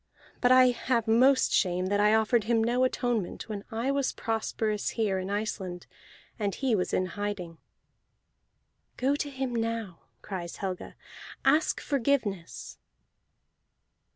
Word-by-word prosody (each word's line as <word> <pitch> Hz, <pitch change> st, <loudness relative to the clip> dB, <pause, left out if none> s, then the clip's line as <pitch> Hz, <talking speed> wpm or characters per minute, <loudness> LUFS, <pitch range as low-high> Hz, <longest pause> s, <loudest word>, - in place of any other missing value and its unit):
But 245 Hz, -, +4 dB
I 255 Hz, 0 st, +7 dB
have 240 Hz, -1 st, 0 dB
most 255 Hz, +4 st, +4 dB
shame 180 Hz, -1 st, +2 dB
that 205 Hz, +2 st, +1 dB
I 210 Hz, +1 st, +5 dB
offered 220 Hz, 0 st, +2 dB
him 225 Hz, -1 st, +2 dB
no 245 Hz, +3 st, +2 dB
atonement 245 Hz, -6 st, -2 dB
when 205 Hz, -2 st, -5 dB
I 230 Hz, +4 st, -1 dB
was 275 Hz, -1 st, 0 dB
prosperous 220 Hz, -1 st, -2 dB
here 205 Hz, -4 st, +1 dB
in 185 Hz, +1 st, -4 dB
Iceland, 200 Hz, -4 st, -3 dB, 0.5 s
and 200 Hz, -2 st, -1 dB
he 265 Hz, -3 st, 0 dB
was 185 Hz, -4 st, 0 dB
in 185 Hz, -, +1 dB
hiding." 185 Hz, -3 st, -5 dB, 1.4 s
"Go 270 Hz, +3 st, +2 dB
to 290 Hz, 0 st, -3 dB
him 265 Hz, -2 st, -3 dB
now," 225 Hz, -5 st, -3 dB, 0.2 s
cries 175 Hz, -4 st, -5 dB
Helga. 185 Hz, -2 st, -5 dB, 0.5 s
"Ask 310 Hz, +1 st, +3 dB
forgiveness!" 235 Hz, -, -2 dB
220 Hz, 130 wpm, -28 LUFS, 195-250 Hz, 1.4 s, I